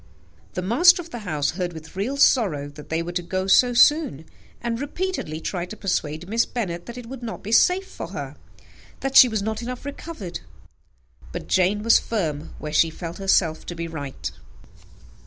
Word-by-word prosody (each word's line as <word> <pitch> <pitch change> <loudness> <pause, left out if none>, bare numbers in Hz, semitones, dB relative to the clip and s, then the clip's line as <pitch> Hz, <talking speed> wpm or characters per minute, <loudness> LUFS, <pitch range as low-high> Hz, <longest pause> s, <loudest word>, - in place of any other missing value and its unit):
The 180 - -2
master 340 - +6
of 340 -1 -8
the 240 - -5
house 145 -2 0
heard 175 0 -3
with 160 +1 -11
real 230 +9 -2
sorrow 180 - +3
that 145 0 -12
they 160 +1 0
were 175 - -5
to 175 0 -1
go 185 +2 -2
so 245 +5 +5
soon, 245 - +4 0.3
and 235 +1 -3
repeatedly 295 - -3
tried 175 +1 -4
to 215 - -8
persuade 160 -4 -2
Miss 230 +3 +2
Bennet 175 -8 -4
that 235 +1 -8
it 245 - -7
would 255 +1 -8
not 230 -2 -6
be 210 - -5
safe 360 +11 +4
for - - -7
her - - -6 0.7
that 270 0 -2
she 255 - +10
was 215 -3 -1
not 220 +1 -2
enough 250 +2 -6
recovered; 285 - -6 0.9
but - - -6
Jane 190 +3 +2
was 230 0 +6
firm 160 -9 -3
where 150 0 -6
she 165 +1 +4
felt 165 +2 -7
herself 180 -5 +2
to 175 - -5
be 170 0 -4
right. 145 -5 -5
195 Hz, 190 wpm, -24 LUFS, 165-240 Hz, 0.9 s, she